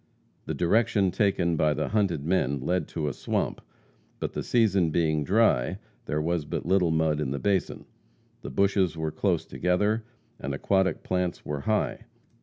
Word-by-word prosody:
The - - -3
direction 100 +1 +2
taken 90 -4 +1
by 75 -1 +2
the 75 - -2
hunted 95 -9 0
men 75 -6 +1
led 90 +7 -1
to 80 -3 -3
a 70 - -1
swamp, - - -2 0.6
but - - -3
the - - -3
season 100 -8 +2
being 80 -2 +1
dry, 95 - +2 0.3
there 75 - -1
was 85 +1 0
but 75 - -4
little 90 -1 +3
mud 80 -1 +1
in 70 - -1
the 70 - -2
basin. 100 +2 -1 0.6
The - - -6
bushes 95 -4 +1
were 80 -1 -2
close - - 0
together, 105 +5 0 0.4
and 70 +1 -3
aquatic 95 +3 +1
plants 90 -1 -2
were 75 -1 -3
high. 110 +8 -1
85 Hz, 165 wpm, -27 LUFS, 75-100 Hz, 0.6 s, little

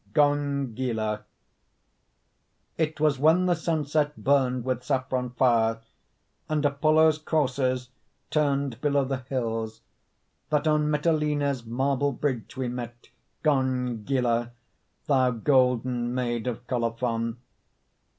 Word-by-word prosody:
GONGYLA 130 -7 0 1.5
It 155 -1 -1
was 150 -3 +2
when 160 +5 +4
the 180 - +3
sunset 155 -3 -1
Burned 130 -3 +1
with 130 -1 -1
saffron 130 -2 -1
fire, 115 -3 +2 0.7
And 155 -1 0
Apollo's 155 +2 +3
coursers 130 -5 0 0.4
Turned 140 -5 0
below 140 -2 +2
the 135 0 -2
hills, 115 -4 -3 0.7
That 150 0 +1
on 150 -1 +2
Mitylene's 150 -4 0
Marble 135 +3 0
bridge 130 -3 -3
we 130 -1 -1
met, 120 -1 -7 0.3
Gongyla, 125 -3 0 0.5
thou 130 -5 +3
golden 125 -1 +1
Maid 120 -2 -2
of 120 0 -4
Colophon. 115 -1 -1
130 Hz, 100 wpm, -26 LUFS, 120-145 Hz, 1.5 s, when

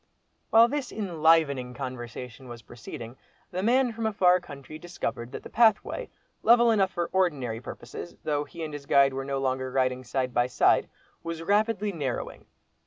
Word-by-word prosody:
While 225 +1 +7
this 280 0 -3
enlivening 160 - +2
conversation 125 0 -7
was 120 -2 -10
proceeding, 120 +1 -9 0.3
the 185 - -2
man 245 +3 +3
from 225 0 -2
a - - 0
far 180 -2 +4
country 145 -2 -10
discovered 155 -8 -5
that - - -7
the - - -9
pathway, 230 - +2 0.3
level 235 0 +6
enough 195 -4 +3
for 175 -2 -3
ordinary 140 -12 0
purposes, 125 +8 -8
though 145 -1 0
he 165 +2 -8
and 155 -1 -5
his 145 -1 -8
guide 140 -1 +5
were 135 0 -4
no 140 0 -2
longer 130 -1 -1
riding 130 -1 0
side 130 0 -2
by 120 +1 +2
side, 125 - +3 0.3
was 165 0 -5
rapidly 210 +2 +1
narrowing. 140 -9 -4
150 Hz, 170 wpm, -27 LUFS, 130-195 Hz, 0.3 s, While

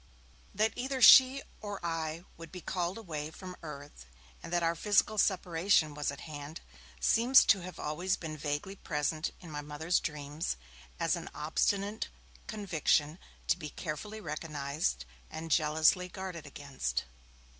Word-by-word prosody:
That 215 +2 +2
either 260 +2 -2
she 260 +1 +9 0.2
or 205 -2 -5
I 165 0 -2
would 165 0 -11
be 185 - -7
called 180 +1 -2
away 155 -8 -5
from 180 +3 -9
earth, 145 - -9 0.3
and - - -9
that 175 -1 +1
our 165 0 +3
physical 210 +4 +2
separation 175 -4 +2
was 145 -1 -2
at 140 - -6
hand, 150 0 -7 0.4
seems 240 - +6
to 200 - +5
have 180 +1 -8
been - - -7
always 175 +5 0
vaguely 155 +3 -4
present 155 +1 -1
in 170 -4 -10
my 145 -1 -4
Mother's 150 +4 0
dreams, 150 - -3 0.4
as - - +2
an - - -6
obstinate 200 +7 0 0.4
conviction 165 -6 +1 0.3
to - - +2
be 150 - -5
carefully 175 +9 -5
recognized 150 - -3 0.2
and 160 +1 -6
jealously 160 +4 +3
guarded 180 -4 -6
against. 140 -1 -3
165 Hz, 145 wpm, -32 LUFS, 150-190 Hz, 0.4 s, she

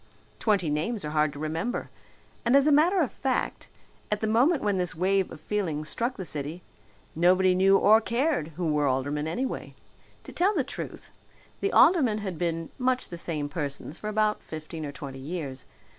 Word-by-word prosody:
Twenty 195 -8 +1
names 165 +7 -2
are 150 - -3
hard 155 -1 +2
to - - -10
remember, 160 - -3 0.5
and 245 +3 +5
as 280 - +4
a 305 - +4
matter 340 +6 +4
of 290 - 0
fact, 265 -2 -2 0.4
at 210 - +1
the 220 - -1
moment 255 +9 +3
when 205 -2 +1
this 180 -2 -2
wave 190 +2 +1
of - - -9
feeling 170 -8 -2
struck 235 +11 -1
the 185 - -5
city, 155 +3 -5 0.5
nobody 185 +3 +4
knew 195 +1 +5
or 215 +3 +6
cared 250 - 0
who 170 -4 0
were 150 -1 +2
aldermen, 145 +3 -1
anyway. 250 +11 -3 0.5
To - - -10
tell 390 +4 +2
the 290 - +2
truth, - - -8 0.5
the 400 - 0
aldermen 265 - +5
had 190 -6 -5
been 165 -1 -2
much 255 0 0
the 170 - -6
same 155 -4 -2
persons 145 +1 -5
for 210 - -5
about 215 0 +1
fifteen 155 0 -7
or - - -5
twenty 140 -2 -8
years. 140 -3 -5
185 Hz, 185 wpm, -27 LUFS, 155-235 Hz, 0.5 s, or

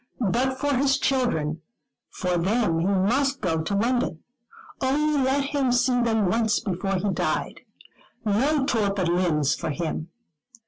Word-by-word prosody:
But 260 +2 0
for 290 0 0
his 270 +1 +2
children, 165 - 0 0.5
for 180 -1 -2
them 180 -1 +1
he 170 - 0
must 250 +9 +1
go 160 -8 -1
to 200 +5 -2
London. 230 -6 0 0.6
Only 290 +2 +1
let 270 +2 +1
him 275 -2 0
see 245 0 +2
them 225 -3 +1
once 220 +3 +1
before 195 0 -2
he 195 +2 -1
died. - - -2 0.7
No 270 +8 +2
torpid 200 -7 0
limbs 160 -5 +1
for - - -4
him. 160 +1 -3
220 Hz, 140 wpm, -25 LUFS, 180-265 Hz, 0.7 s, his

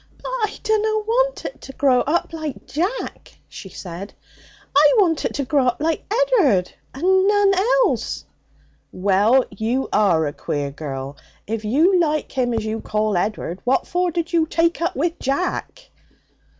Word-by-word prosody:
'But - - -7
I 465 -5 -2
dunna 435 0 +1
want - - 0
it - - -7
to 270 - -10
grow 260 -2 +3
up 330 +5 0
like 310 -4 -6
Jack,' 370 - -4
she 190 - -10
said. 185 +2 -8 0.6
'I 290 0 +6
want 340 -7 +2
it - - -2
to 280 - -2
grow 270 -1 +2
up 245 - +1
like 320 +4 -2
Ed'ard, 420 - +2 0.2
and 375 +6 +2
none 410 -1 +4
else!' - - +1 0.7
'Well! 205 +7 +3
You 225 +6 -2
are 180 -7 +3
a 145 - -3
queer 145 -1 -3
girl. 140 -1 -6 0.3
If 220 +1 -4
you 325 - +3
like 305 -3 0
him 250 -2 0
as 220 -1 -2
you 220 0 -3
call 215 -1 -1
Ed'ard 185 -1 -2
what 255 +2 +1
for 360 0 0
did 340 +1 -3
you 325 -2 +3
take 335 +1 +1
up 340 - -1
with 335 +5 -1
Jack?' 365 - -3
290 Hz, 165 wpm, -21 LUFS, -, 0.7 s, I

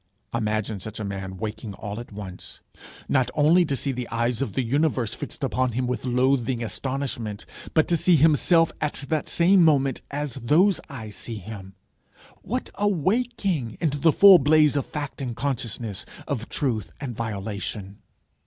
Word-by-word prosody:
Imagine 110 -2 -1
such 110 +3 -7
a - - -3
man 95 -1 -5
waking 105 0 -5
all 105 +1 -6
at 120 - -9
once, 95 -3 -9 0.5
not 130 -3 +2
only 155 +4 +5
to 140 -3 -1
see 140 - -1
the 125 -2 -5
eyes 120 +1 0
of 115 -8 -2
the 130 - 0
universe 130 -3 0
fixed - - -7
upon 130 -2 0
him 125 +2 -1
with 125 -2 -3
loathing 125 -1 +1
astonishment, 120 -4 -4 0.3
but 155 - +4
to 170 - +2
see 175 +2 +4
himself 160 +2 +4
at 150 -2 -3
the 155 -2 +1
same 180 +3 +4
moment 140 -5 +3
as 145 -2 -3
those 175 - +4
eyes 110 -7 -7
see 115 -2 -5
him! 95 -2 -9 0.7
What - - -4
a 205 - +2
waking! 195 - 0
into 145 -4 0
the 160 +3 +5
full 195 +2 +8
blaze 150 0 +4
of 140 - -1
fact 145 -2 -5
and 125 -3 -3
consciousness, 115 -6 -3 0.2
of 125 -6 -3
truth 110 - -2
and 130 -4 -5
violation! 100 -2 -5
130 Hz, 165 wpm, -25 LUFS, 110-150 Hz, 0.7 s, full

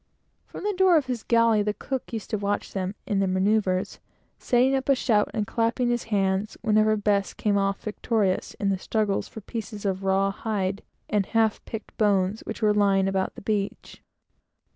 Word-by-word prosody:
From - - -9
the 415 0 0
door 370 -2 +5
of 295 - +1
his 250 -3 -3
galley, 230 -1 +3
the 210 0 -1
cook 265 +4 -5
used 225 -3 -6
to 215 - +1
watch 205 0 -2
them 190 +1 -3
in 205 -7 0
their 195 - +2
manoeuvres, 190 0 +1 0.4
setting 255 +2 +3
up 265 0 -1
a 275 - +6
shout 215 -5 +2
and 215 -2 -1
clapping 230 +3 0
his 240 -1 -1
hands 195 -1 0
whenever 215 -1 +3
Bess 200 -1 0
came 210 -1 0
off 195 0 0
victorious 210 -2 -1
in 200 - -1
the 195 -1 0
struggles 210 -1 -1
for 220 - -10
pieces 215 -1 -6
of 190 -1 -1
raw 195 +1 +2
hide 195 -2 -2 0.3
and 205 -2 0
half 225 -2 +1
picked 220 -2 -8
bones 200 -1 +2
which 220 - -5
were 210 -1 +4
lying 195 -2 +3
about 190 -1 -1
the - - -11
beach. 205 -1 -3
210 Hz, 185 wpm, -25 LUFS, 195-225 Hz, 0.4 s, a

